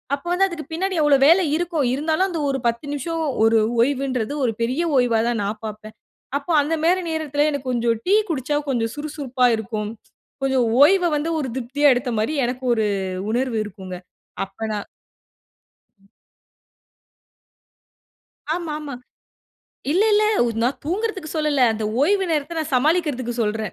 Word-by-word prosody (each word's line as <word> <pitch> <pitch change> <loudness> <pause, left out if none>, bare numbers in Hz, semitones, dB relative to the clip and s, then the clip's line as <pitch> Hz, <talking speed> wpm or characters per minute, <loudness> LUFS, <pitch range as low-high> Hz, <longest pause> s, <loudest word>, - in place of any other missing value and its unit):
அப்போ 285 +5 -13
வந்து 390 +2 +3
அதுக்கு 335 -6 -7
பின்னாடி 375 +2 -1
எவ்ளோ 290 -2 +5
வேலை 355 +3 +6
இருக்கும். 335 -4 -1
இருந்தாலும் 315 +6 +1
அந்த 335 -3 -3
ஒரு 270 - 0
10 235 +4 -2
நிமிஷம் 325 +4 -3 0.2
ஒரு 225 0 +5 0.2
ஓய்வுன்றது 260 -2 0
ஒரு 230 - +1
பெரிய 255 +8 0 0.2
ஓய்வா 245 -3 +3
தான் 230 -3 -1
நான் 215 +2 -4
பார்ப்பேன். 215 0 -8 0.4
அப்ப 285 +4 -10
அந்தமாரி 325 +5 +1
நேரத்தில 300 -2 0
எனக்கு 275 -2 -4
கொஞ்சம் 235 -2 0
டீ 400 - +5
குடிசச்சா 290 -1 -1
கொஞ்சம் 230 -3 -1
சுறுசுறுப்பா 285 -4 -1
இருக்கும். 215 -1 -4 0.5
கொஞ்சம் 265 -3 +2 0.2
ஓய்வ 360 +3 +5
வந்து 325 +3 -2
ஒரு 275 - -2
திருப்தியா 275 +4 +2
எடுத்தமாரி 245 +2 -1
எனக்கு 255 +1 -4
ஒரு 220 -2 +1 0.4
உணர்வு 245 -1 0
இருக்குங்க. 185 -2 -8 0.5
அப்ப 195 - -25
நான் 205 - -4 1.1
ம். 195 - -26 2.5
ஆமா, 335 -4 -4
ஆமா. 290 -3 -7 1.0
இல்ல, 390 +5 +3
இல்ல 425 +1 +4 0.2
உ - - +1
நான் 250 +3 0
தூங்குறதுக்கு 380 -1 -2
சொல்லல. 300 -3 +1
அந்த 220 0 -4 0.2
ஓய்வு 385 +6 +3
நேரத்த 315 +2 -1
நான் 310 -1 -5
சமாளிக்குறதுக்கு 275 -4 +1
சொல்றேன். 215 -1 -2
280 Hz, 145 wpm, -22 LUFS, 235-320 Hz, 2.5 s, வேலை